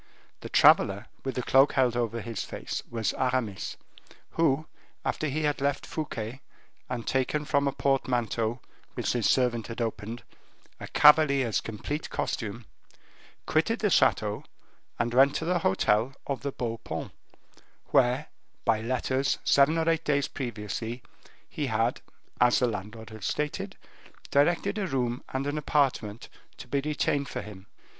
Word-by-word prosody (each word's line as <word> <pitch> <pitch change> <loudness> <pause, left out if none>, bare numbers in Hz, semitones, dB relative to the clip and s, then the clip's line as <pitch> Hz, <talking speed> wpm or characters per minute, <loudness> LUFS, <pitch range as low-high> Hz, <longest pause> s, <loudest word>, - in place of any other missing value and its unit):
The - - -8
traveler 100 +3 +5 0.2
with 135 - -3
the 125 - -2
cloak 135 +3 +5
held 125 -3 +2
over 115 -1 -1
his 115 -2 -4
face - - -5
was 115 -2 -1
Aramis, 125 -6 -1 0.5
who, 155 -2 +2 0.4
after 155 - -1
he 155 +2 -2
had 145 -2 0
left 140 0 0
Fouquet, 130 -5 -5 0.5
and 115 - -4
taken 135 +3 0
from 140 -1 +2
a - - +2
portmanteau, 120 -4 0 0.3
which - - -1
his 120 -4 +1
servant 120 -3 +2
had 115 +1 -7
opened, 115 0 -4 0.6
a - - -7
cavalier's 140 -7 +5
complete 130 +8 -5
costume, 115 -1 -3 0.8
quitted - - +1
the - - 0
chateau, - - +2 0.5
and 120 0 -1
went 135 +3 +5
to 160 - -2
the 175 +1 +1
hotel 110 - +2
of 140 -2 -3
the 140 - -2
Beau 115 -3 -4
Paon, - - -5 0.8
where, 125 +5 +3 0.4
by 110 -1 +2
letters, 130 +3 0
seven 140 +4 +4
or 165 0 0
eight 165 -1 +2
days 145 -2 +1
previously, 115 -1 -5 0.4
he 145 - -3
had, 115 -1 0 0.4
as 120 0 +5
the 125 - +3
landlord 110 +1 -6
had 110 -2 -10
stated, 150 +8 -2 0.5
directed 175 +8 +2
a 195 - -1
room 125 -5 -1
and 135 +1 -2
an 145 +1 -1
apartment 130 -8 0 0.3
to - - -10
be 140 - 0
retained 145 -1 0
for - - -4
him. 100 -2 -11
130 Hz, 150 wpm, -28 LUFS, 115-145 Hz, 0.8 s, traveler